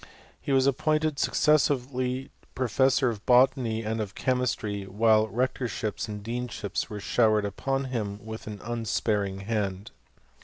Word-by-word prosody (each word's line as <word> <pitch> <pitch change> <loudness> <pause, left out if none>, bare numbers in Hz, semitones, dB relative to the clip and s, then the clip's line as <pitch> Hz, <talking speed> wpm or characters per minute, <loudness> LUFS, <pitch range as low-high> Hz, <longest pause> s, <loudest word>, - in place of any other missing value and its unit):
He - - -3
was 135 -1 +4
appointed 155 +2 +1
successively 130 -2 +1 0.2
professor 130 +1 +2
of 105 -2 -8
botany 125 -3 +4
and 110 +1 -2
of 100 -2 -5
chemistry, 110 -6 -1
while 110 +2 +3
rectorships 120 -1 -2
and 105 -1 -6
deanships 120 -2 -3
were 105 - -5
show 110 +2 +3
ered 105 -1 +2
upon 135 +7 -2
him 110 -6 -3
with 110 0 -7
an 105 -2 -7
unsparing 105 -4 -1
hand. 100 -2 -2
115 Hz, 130 wpm, -27 LUFS, 105-130 Hz, 0.2 s, was